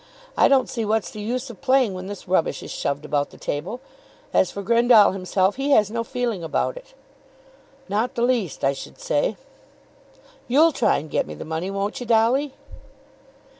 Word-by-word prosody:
I - - +5
don't 270 -2 +3
see 230 - -3
what's 220 0 0
the 210 - -8
use 245 +4 -3
of 235 - -15
playing 260 -5 +3
when 185 0 -6
this 200 -1 -8
rubbish 180 -3 0
is - - -8
shoved 140 +1 -3
about 145 -1 0
the - - -16
table. 185 - -4 0.5
As 185 - +3
for 200 - -6
Grendall 235 -1 +5
himself, 190 +2 0
he 275 +1 -1
has 210 -3 +4
no 230 0 -2
feeling 230 -6 -3
about 165 - -1
it." - - -13 0.9
"Not 215 +5 -1
the 235 - 0
least, 240 - 0
I 135 - +3
should 140 - -10
say." - - 0 1.1
"You'll 305 +7 +5
try 250 - +2
and 145 +2 -6
get - - 0
me 75 - -7
the - - -8
money, 160 +4 -3
won't 200 +1 -3
you, 245 - -7
Dolly?" 240 +5 +2
220 Hz, 185 wpm, -23 LUFS, 185-250 Hz, 1.1 s, I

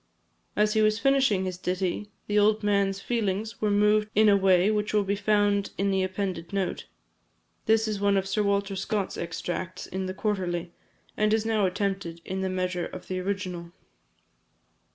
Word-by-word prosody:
As 210 0 +2
he 220 - +3
was 215 0 +3
finishing 265 -6 +2
his 185 -1 -4
ditty, 185 +3 -2 0.2
the 210 0 +2
old 215 +1 +3
man's 200 -1 +1
feelings 215 -1 -2
were 215 - +2
moved 210 +1 +3
in 215 +1 +6
a 200 - +6
way 190 0 +4
which 210 0 -1
will 210 - +4
be 200 +1 0
found 205 0 +2
in 195 +1 +1
the 190 0 +1
appended 185 -2 -3
note. 195 -2 -2 0.8
This 220 0 +3
is 210 -2 -2
one 200 -1 +3
of 190 0 -1
Sir 195 +2 0
Walter 200 -1 0
Scott's 195 +1 -2
extracts 175 +1 -4
in 190 0 -4
the 185 - -5
Quarterly, 180 -5 -2 0.4
and 215 0 +2
is 220 0 -1
now 215 -3 +2
attempted 190 -3 -3
in 190 +1 -3
the 190 - -1
measure 185 -1 -2
of 185 - -10
the 185 0 -2
original. 180 -3 -4
200 Hz, 175 wpm, -27 LUFS, 185-210 Hz, 0.8 s, in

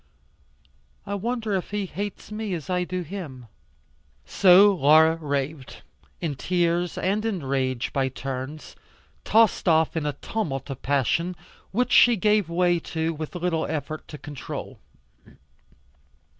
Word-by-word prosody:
I 200 - -4
wonder 225 +1 -2
if 190 -2 -2
he 205 -1 -2
hates 205 +2 -6
me 210 -3 -3
as 165 +2 -6
I 180 0 0
do 180 0 -3
him?" 155 -8 -8 0.8
So 195 +2 +6
Laura 160 0 +5
raved, 145 -2 -4 0.4
in 160 -4 -2
tears 175 +3 0
and 200 +3 0
in 205 -8 -2
rage 130 -2 -1
by 135 -2 +1
turns, 135 +3 -6 0.5
tossed 225 -3 +3 0.3
in 155 -2 -1
a 145 - -1
tumult 145 - -3
of 135 - -7
passion, 145 +6 0 0.3
which 250 +4 0
she 240 -1 +7
gave 210 -3 +2
way 175 0 +2
to 160 0 -2
with 155 +2 -7
little 175 -2 -1
effort 155 0 -4
to 150 - -9
control. 145 -2 -7
170 Hz, 130 wpm, -25 LUFS, 145-195 Hz, 0.8 s, she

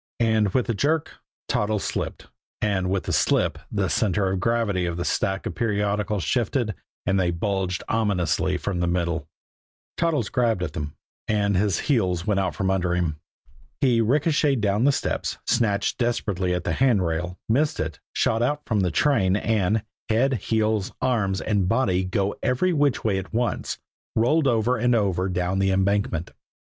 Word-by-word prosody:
And 110 -3 +2
with 125 - +3
the 115 - -1
jerk, 145 +8 0 0.3
Toddles 105 0 0
slipped; - - -3 0.3
and 95 -3 0
with 95 -1 0
the - - -3
slip, - - +2
the - - 0
center 95 -2 +1
of 95 - -1
gravity 105 -4 0
of 85 -1 -3
the 85 - -2
stack 95 -3 -1
of - - -3
periodicals 105 -2 -1
shifted, 115 - 0 0.3
and 95 0 +2
they 90 -2 +2
bulged 95 +1 -1
ominously 90 -5 +1
from 90 -1 -3
the 85 - +1
middle. 85 -3 -1 0.7
Toddles 160 -10 +1
grabbed 115 -7 +1
at 80 -4 -4
them 75 -1 -5 0.3
and 105 -2 +1
his 100 +1 +1
heels 90 - +1
went 105 -2 +1
out 95 - -1
from 95 -2 0
under 90 -2 +1
him. 85 -4 -1 0.6
He 120 -4 +3
ricocheted 140 +2 +2
down 105 +3 +1
the 145 - +6
steps, - - -2
snatched 105 0 +1
desperately 100 -7 0
at 90 - -3
the - - -1
handrail, 90 -8 +1
missed 145 +7 +1
it, 80 +1 -3
shot 115 - +1
out 145 +5 0
from 110 -3 0
the 90 -2 +2
train, 95 - +2
and, 105 -1 +1 0.3
head, 125 +5 +2 0.2
heels, 110 -3 +1
arms 110 -7 0
and 100 -4 0
body 95 -6 +2
going 95 +2 -1
every 175 +9 +1
which 145 -4 +1
way 100 -4 +1
at 95 - -8
once, 120 +1 -1 0.4
rolled 140 +7 +3
over 120 +1 +2
and 120 +1 +2
over 95 -4 +1
down 90 +1 -1
the 95 0 +2
embankment. 95 -3 0
100 Hz, 170 wpm, -24 LUFS, 95-115 Hz, 0.7 s, the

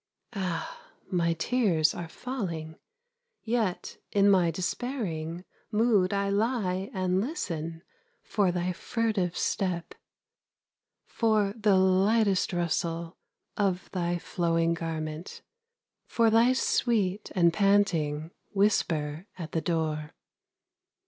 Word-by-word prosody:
Ah, 190 - -3 0.3
my 170 -2 +2
tears 170 -5 +2
are 175 - -5
falling, 170 -8 -5 0.7
Yet 220 -5 -1
in 200 0 +5
my 180 -3 +4
despairing 175 - -3 0.3
Mood 210 -4 +3
I 200 0 0
lie 200 -3 0
and 185 -1 0
listen 165 - -4 0.4
For 200 -4 +1
thy 180 +1 -1
furtive 205 -4 -1
step; 180 -4 -1 1.1
For 215 -3 +1
the 210 -3 +3
lightest 190 +2 +3
rustle 170 -1 -2 0.4
Of 195 -4 -1
thy 175 -1 -1
flowing 165 -1 0
garment, 160 0 -5 0.6
For 230 -1 +3
thy 230 +3 +5
sweet 215 -6 0
and 170 -2 +4
panting 170 -6 +2 0.2
Whisper 170 -5 +1
at 165 -3 -6
the 160 - -1
door. 155 -2 -2
185 Hz, 100 wpm, -28 LUFS, 165-210 Hz, 1.1 s, in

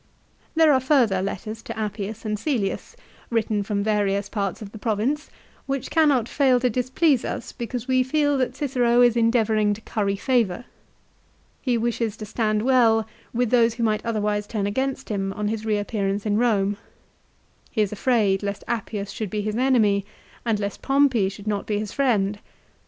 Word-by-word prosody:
There 320 -2 +6
are 260 - +4
further 250 -8 +3
letters 215 +3 -4
to - - -7
Appius 210 +1 -4
and 215 0 -1
Cselius, 225 -3 -2 0.3
written 220 -3 0
from 200 0 -1
various 205 -2 0
parts 200 -3 -2
of 205 -2 -9
the 220 - -10
Province, 235 +8 -1 0.4
which 270 -1 -3
cannot 290 -8 +3
fail 260 -3 +3
to 250 -1 +2
displease 255 +3 +2
us - - -4
because 240 +1 -5
we 255 -1 +3
feel 290 +2 +1
that 255 - -1
Cicero 245 -4 +2
is 240 -1 +4
endeavouring 220 -3 +2
to 220 - -12
curry 200 -3 -1
favour. 235 -2 0 1.0
He 250 -3 +1
wishes 230 -1 -1
to 215 - -6
stand 215 0 0
well 230 -4 +4 0.3
with 245 -1 0
those 235 -2 +4
who 235 - -2
might 215 -1 +1
otherwise 210 -2 -1
turn 210 -3 -2
against 265 +6 -2
him 195 -2 -2
on 210 0 -2
his 220 0 -3
reappearance 205 -1 -1
in 210 0 +1
Rome. 205 -4 +2 0.9
He 220 - 0
is 205 - -3
afraid 210 -3 +2
lest 200 -1 -4
Appius 210 -3 -3
should 215 -3 -4
be 210 +2 -2
his 210 +1 -2
enemy 225 -6 +3 0.4
and 225 -3 0
lest 200 -1 -4
Pompey 270 -8 +3
should 200 +1 -11
not 205 -2 -2
be 210 - 0
his 210 -1 -4
friend. 210 -7 +1
220 Hz, 175 wpm, -24 LUFS, 205-250 Hz, 1.0 s, There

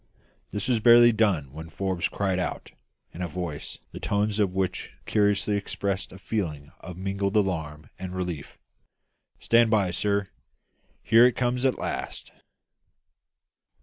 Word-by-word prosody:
This 105 +2 -3
was 125 -3 +2
barely 120 +1 +7
done 95 - +1
when 80 +2 -8
Forbes 95 +1 -2
cried 95 -2 -1
out, 90 - -4 0.4
in 90 - -8
a 90 - -1
voice 85 -3 -5
the - - -8
tones 105 +1 0
of 100 -3 +2
which 95 -1 -2
curiously 105 0 +2
expressed 100 -1 -3
a 95 - -11
feeling 80 -9 -4
of 90 -2 -9
mingled 100 +2 -1
alarm 80 -7 -1
and 95 0 -6
relief 90 -5 -5 0.8
"Stand 115 0 +4
by, 100 -5 +2
sir; 100 +1 0 0.7
here 115 +2 +7
it 125 - -1
comes 125 +1 0
at 130 - +2
last!" - - -5
100 Hz, 140 wpm, -26 LUFS, 90-105 Hz, 0.8 s, barely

